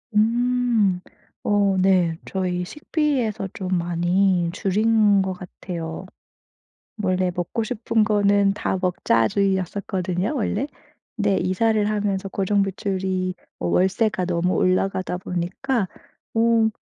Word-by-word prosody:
음. 230 Hz, -3 st, +2 dB, 0.4 s
어 200 Hz, -2 st, +2 dB
네. 185 Hz, -3 st, +3 dB
저희 180 Hz, -2 st, -2 dB
식비에서 245 Hz, -, -1 dB
좀 185 Hz, -1 st, -2 dB
많이 175 Hz, +1 st, +1 dB
줄인 205 Hz, +1 st, +3 dB
것 190 Hz, 0 st, -1 dB
같아요. 180 Hz, -2 st, -7 dB, 1.0 s
원래 185 Hz, -2 st, +1 dB
'먹고 175 Hz, +6 st, -2 dB
싶은 220 Hz, 0 st, 0 dB
거는 205 Hz, -2 st, +3 dB
다 190 Hz, -, -2 dB
먹자.' 145 Hz, -11 st, +2 dB
주의였었거든요, 190 Hz, -, -1 dB
원래. 250 Hz, +1 st, -1 dB, 0.5 s
근데 205 Hz, -3 st, +1 dB
이사를 210 Hz, +3 st, +1 dB
하면서 200 Hz, -2 st, -1 dB
고정 200 Hz, +1 st, +1 dB
지출이 190 Hz, -1 st, -2 dB, 0.2 s
어 -, -, -2 dB
월세가 190 Hz, +2 st, +1 dB
너무 175 Hz, +1 st, 0 dB
올라가다 185 Hz, 0 st, +1 dB
보니까 185 Hz, +6 st, -2 dB, 0.5 s
어 225 Hz, -1 st, +3 dB
195 Hz, 230 characters per minute, -23 LUFS, 180-215 Hz, 1.0 s, 네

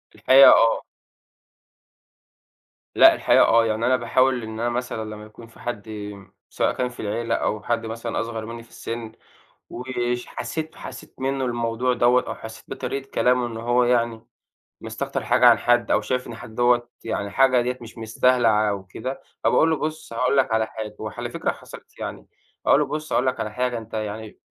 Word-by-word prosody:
الحقيقة 135 Hz, +1 st, +8 dB
آه. 115 Hz, 0 st, +4 dB, 2.1 s
لأ، -, -, +8 dB
الحقيقة -, -, +4 dB
آه، 115 Hz, 0 st, +4 dB
يعني 110 Hz, +1 st, -1 dB
أنا 130 Hz, -, +4 dB
باحاول 130 Hz, +1 st, +1 dB
إن 110 Hz, 0 st, -7 dB
أنا 120 Hz, +1 st, 0 dB
مثلًا 120 Hz, -2 st, -3 dB
لمّا 105 Hz, 0 st, -10 dB
يكون 110 Hz, +2 st, -14 dB
في 115 Hz, -, -19 dB
حد، 110 Hz, -3 st, -5 dB, 0.6 s
سواء -, -, 0 dB
كان 125 Hz, -1 st, -1 dB
في 125 Hz, -, -15 dB
العيلة، 115 Hz, +2 st, -1 dB
أو 105 Hz, -1 st, -2 dB
حد 115 Hz, 0 st, -1 dB
مثلًا 115 Hz, +1 st, -4 dB
أصغر 115 Hz, -1 st, -5 dB
منّي 115 Hz, +1 st, -8 dB
في 115 Hz, -, -22 dB
السِن، 115 Hz, -1 st, -6 dB, 0.6 s
ويش 125 Hz, -1 st, -3 dB
حسيت 160 Hz, 0 st, -5 dB
حسيت 130 Hz, 0 st, -10 dB
منه 135 Hz, 0 st, -1 dB
الموضوع 120 Hz, +1 st, 0 dB
دوّة، 120 Hz, +1 st, +3 dB
أو -, -, -4 dB
حسيت 110 Hz, 0 st, -10 dB
بطريقة 135 Hz, 0 st, -5 dB
كلامه، 125 Hz, 0 st, +2 dB
إنه 115 Hz, -1 st, -6 dB
هو 120 Hz, +1 st, +2 dB
يعني 115 Hz, -2 st, 0 dB, 0.5 s
مستكتر -, -, -4 dB
حاجة -, -, +4 dB
عن -, -, +7 dB
حد، 120 Hz, 0 st, +2 dB
أو 105 Hz, -, +4 dB
شايف 125 Hz, +4 st, -2 dB
إن -, -, -7 dB
حد 110 Hz, -2 st, -11 dB
دوّة 120 Hz, 0 st, +2 dB, 0.2 s
يعني 100 Hz, -3 st, -3 dB
حاجة 130 Hz, +2 st, +4 dB
ديّة 125 Hz, +1 st, -3 dB
مش 115 Hz, 0 st, -11 dB
مستاهلة 120 Hz, +2 st, +2 dB, 0.2 s
أو 100 Hz, -2 st, -3 dB
كده، 130 Hz, +8 st, -6 dB, 0.2 s
فباقول 160 Hz, -, +4 dB
له: 160 Hz, -, +2 dB
"بُص 155 Hz, -2 st, -5 dB
هاقول 125 Hz, +4 st, +1 dB
لك 135 Hz, -3 st, +2 dB
على 110 Hz, 0 st, +2 dB
حاجة" 110 Hz, -1 st, -7 dB
وعلى 110 Hz, -1 st, -5 dB
فكرة -, -, -1 dB
حصلِت، -, -, -14 dB
يعني -, -, -6 dB, 0.4 s
أقول 140 Hz, -, +5 dB
له: 150 Hz, -, +1 dB
"بُص 155 Hz, +2 st, -5 dB
هاقول 125 Hz, -, +2 dB
لك 130 Hz, -, -1 dB
على 105 Hz, -, -3 dB
حاجة، 125 Hz, +1 st, -1 dB
أنت 110 Hz, 0 st, -11 dB
يعني 110 Hz, 0 st, -5 dB
120 Hz, 185 wpm, -23 LUFS, 110-125 Hz, 2.1 s, الحقيقة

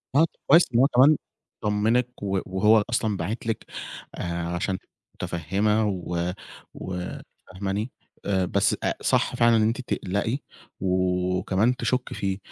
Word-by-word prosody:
آه 155 Hz, +3 st, +6 dB, 0.2 s
كويس 165 Hz, +5 st, +8 dB
إن 120 Hz, -, +4 dB
هو 135 Hz, -, +6 dB
كمان 140 Hz, +3 st, +5 dB, 0.4 s
طمّنك، 110 Hz, +4 st, +1 dB
و 95 Hz, -1 st, 0 dB
وهو 105 Hz, +3 st, +4 dB
أصلًا 110 Hz, -4 st, 0 dB
باعت 105 Hz, +7 st, -4 dB
لِك 115 Hz, -, -2 dB, 0.5 s
آآ 85 Hz, 0 st, -3 dB
عشان 90 Hz, +2 st, -1 dB, 0.4 s
مُتفهِمة 100 Hz, +7 st, 0 dB
و 90 Hz, -2 st, -2 dB, 0.4 s
و 90 Hz, -1 st, -5 dB, 0.5 s
فاهماني؟ 100 Hz, +5 st, -3 dB, 0.3 s
آآ 95 Hz, -2 st, +1 dB
بس -, -, +2 dB
أ -, -, +1 dB
صح -, -, +2 dB
فعلًا 115 Hz, -1 st, +5 dB
إن -, -, +3 dB
أنتِ 115 Hz, +4 st, +1 dB
تقلقي 100 Hz, +3 st, -1 dB, 0.4 s
وكمان 90 Hz, +4 st, +1 dB
تشُكي 125 Hz, 0 st, -1 dB
فيه. 95 Hz, -1 st, -1 dB
100 Hz, 135 wpm, -25 LUFS, 90-115 Hz, 0.5 s, كويس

